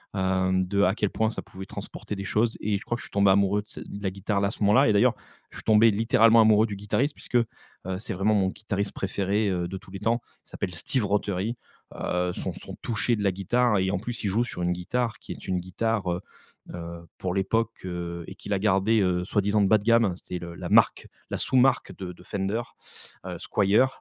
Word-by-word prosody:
Hem, 95 0 +1
de 100 +1 +2
à 95 - +4
quel 105 -3 0
point 110 0 0
ça - - -5
pouvait 95 +1 -10
transporter 105 - -7
des 100 - -5
choses 110 +3 +1
et 105 -1 0
je - - -10
crois 120 - -1
que 120 - -7
je - - -9
suis - - -23
tombé 100 -1 +4
amoureux 100 +1 +3
de - - -34
ce - - -8
de 100 0 -8
la 95 - 0
guitare, 100 +2 -1
là 100 - +2
à - - -2
ce - - -8
moment-là 110 +7 +5
et 105 - +4
d'ailleurs, 100 - +4 0.3
je - - -12
suis - - -9
tombé 110 +1 +6
littéralement 115 +1 +5
amoureux 110 0 +5
du 105 - -5
guitariste 105 +9 0
puisque, - - -8
heu, 120 -1 +5 0.5
c'est 115 - -4
vraiment 100 +4 +2
mon 95 -2 +2
guitariste 100 -1 -3
préféré, 100 +2 0
heu, 90 -2 -1
de 95 +2 -5
tous 95 0 -15
les 95 - -6
temps. 115 +3 +1 0.2
Il - - -22
s'appelle 90 - -4
Steve 115 - -1
Rothery. 100 +2 -1 0.4
Heu, 90 0 -1
son - - -4
son - - -9
touché 120 0 0
de 105 - -3
la 100 - +3
guitare 105 +4 +1
et 95 0 +1
en 100 - 0
plus, 120 +2 -5
il 105 - 0
joue 110 +5 +2
sur 105 - -6
une 90 - +1
guitare 115 +7 -2
qui - - -10
est - - -8
une 90 -1 0
guitare, 95 +1 -1
heu, 90 +2 -2 0.5
heu, 85 0 -7
pour 90 - -2
l'époque, 115 +4 0
heu 85 -1 -5
et 95 - -8
qu'il 100 - -7
a 100 - +2
gardée, 105 +2 +3
heu, 90 -2 +1
soi-disant 105 +1 +1
bas 110 +2 +5
de 100 - -11
gamme, 115 0 +5
hein. 90 - -1
C'était 90 0 -6
le 85 -1 -8
la - - -5
marque, - - +4 0.2
la - - -2
sous-marque 130 0 +2
de 90 -2 -6
de 90 - -16
Fender. 100 +4 -2 0.6
Heu, - - -5
Squier. 105 +5 +3
100 Hz, 240 wpm, -26 LUFS, 95-110 Hz, 0.6 s, tombé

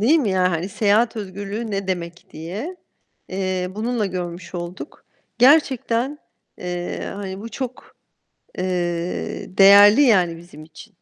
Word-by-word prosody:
değil 290 +10 +4
mi? 225 -9 0
Yani, 185 -1 +2
hani, 170 +2 -2
seyahat 215 +4 +2
özgürlüğü 205 +2 -5
ne 195 -1 -3
demek 175 -2 -4
diye, 205 - -6 0.5
eee, 185 -1 -2
bununla 225 0 -1
görmüş 175 -1 -6
olduk. 175 - -7 0.3
Gerçekten, 265 0 +3 0.4
eee, 175 0 -4
hani, 195 -1 -6
bu 230 - -7
çok, 255 0 -7 0.6
eee, 180 0 -3
değerli 205 +5 +8
yani 185 -10 +3
bizim 165 -3 -13
için. 160 +7 -15
195 Hz, 125 wpm, -21 LUFS, 180-225 Hz, 0.6 s, değerli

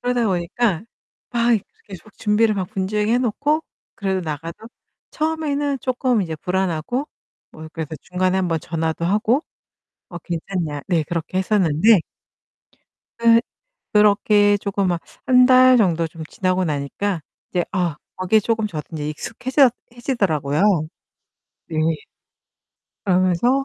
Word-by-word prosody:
그러다 245 -1 0
보니까 185 +1 0 0.5
막 235 -1 +3 0.3
계속 200 +2 -12
준비를 215 +1 +2
막 190 -2 -1
분주하게 210 +2 0
해 245 - +3
놓고 285 +6 0 0.3
그래도 190 -2 -1
나가서 160 0 -5 0.6
처음에는 295 -3 -1
쪼끔 255 -3 +1
이제 165 -3 -4
불안하고 190 - -1 0.4
뭐 160 0 -10
그래서 160 -2 -5
중간에 185 +1 0
1 180 -2 0
번 165 - 0
전화도 160 +1 -3
하고 215 - +2 0.7
"어 175 - -7
괜찮냐." 165 -3 -4
네, 170 -4 +2
그렇게 170 +1 -3
했었는데 190 +1 +4 1.2
그 230 0 +5 0.5
그렇게 205 0 +4
쪼금 200 -1 -1
막 175 -2 0 0.3
1 250 -1 +6
달 255 0 +7
정도 170 -6 +2
좀 160 0 -9
지나고 185 +2 -1
나니까 155 +5 -2 0.3
이제 175 -2 +1
아 175 -5 0 0.2
거기에 185 +4 +3
쪼금 220 0 0
저도 155 -6 -5
이제 150 -2 -3
익숙해져 260 - +2 0.3
해지더라고요. 175 - 0 1.1
네. 160 - -5 1.3
그러면서 185 +8 +2
195 Hz, 270 characters per minute, -21 LUFS, 170-235 Hz, 1.3 s, 달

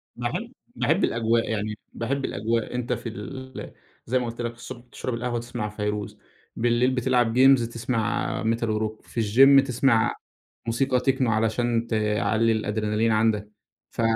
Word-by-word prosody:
باحب - - -3 0.2
باحب - - +1
الأجواء، 115 0 +1
يعني 105 -1 -2 0.2
باحب 135 +4 -2
الأجواء. 115 +3 -2
أنت 125 -1 -1
في 115 - -5
ال 130 +5 -8 0.3
زي 130 +2 +1
ما 125 - -2
قُلت 120 +1 -5
لك 120 0 -3
الصبح 120 +1 -9
تشرب 130 - -4
القهوة، 120 0 -2
تسمع 120 -2 -4
فيروز. 105 -1 -4 0.4
بالليل 120 +2 +2
بتلعب 125 -2 +1
جيمز، 130 0 +6
تسمع 115 -2 -2
metal 115 +1 0
وrock. 110 0 -2
في 115 - -2
الgym، 135 +6 +6
تسمع 120 -2 +2 0.5
موسيقى 125 +2 +1
techno 135 +1 0
علشان 115 +1 +1
تعلّي 110 +1 +1
الأدرينالين 110 +1 0
عندك. 110 -1 +1 0.4
ف - - -4
115 Hz, 145 wpm, -25 LUFS, 110-125 Hz, 0.5 s, جيمز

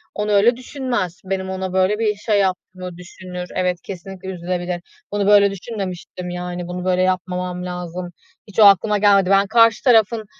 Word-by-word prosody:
onu 210 0 -1
öyle 215 +4 +4
düşünmez. 245 - -3
Benim 190 0 -3
ona 190 0 -4
böyle 190 +3 +2
bir 215 -2 +1
şey 205 0 0
yaptığımı 185 -2 -3
düşünür. 180 0 -8
Evet, 180 -1 -1
kesinlikle 190 0 -8
üzülebilir. 175 0 -3 0.3
Bunu 205 -1 0
böyle 200 -1 +6
düşünmemiştim, 185 -3 -6
yani, 180 0 -5
bunu 180 0 -5
böyle 185 0 +2
yapmamam 180 0 -2
lazım. 180 0 -5 0.4
Hiç 205 - -6
o - - +8
aklıma 205 +1 +5
gelmedi. 200 -2 +4
Ben 195 0 +4
karşı 230 0 +4
tarafın 225 -3 +3
190 Hz, 160 wpm, -20 LUFS, 180-205 Hz, 0.4 s, o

